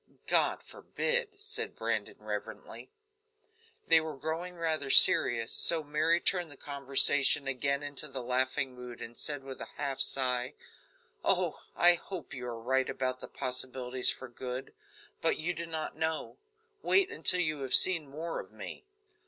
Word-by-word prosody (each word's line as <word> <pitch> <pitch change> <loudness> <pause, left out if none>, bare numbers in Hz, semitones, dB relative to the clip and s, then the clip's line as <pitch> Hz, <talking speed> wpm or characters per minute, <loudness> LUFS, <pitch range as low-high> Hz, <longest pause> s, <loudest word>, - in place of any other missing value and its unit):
"God - - +1
forbid!" 485 -2 -2
said 420 +2 -4
Brandon - - -2
reverently. - - -8 1.0
They 160 - +5
were 155 -3 -7
growing 165 +5 -5
rather 160 -4 -2
serious, 115 -3 +8
so 165 -2 +5
Mary 155 +3 +1
turned 175 -2 -1
the 145 - -7
conversation 140 0 +2
again 140 +2 -1
into 145 +1 -5
the 135 -3 -7
laughing 130 +2 -1
mood, 125 -1 -10
and 115 - -9
said, 145 +1 -5
with 135 -1 -10
a - - -7
half 140 -2 -4
sigh: 125 -2 -1 0.7
"Oh! - - 0
I 175 0 +5
hope 175 -2 -8
you 125 -1 -7
are 115 -1 -6
right 130 +3 0
about 130 0 -3
the - - -9
possibilities 130 0 -1
for 130 - -2
good, 125 +2 -7 0.5
but - - +1
you 170 +3 -2
do 170 0 -7
not 160 -1 -5
know. 160 0 -4 0.4
Wait 385 -1 +2
until 180 - +3
you 155 -3 -1
have 135 -2 +3
seen 165 -6 +3
more 160 +4 -5
of - - -10
me." - - -10
140 Hz, 155 wpm, -30 LUFS, 130-160 Hz, 1.0 s, serious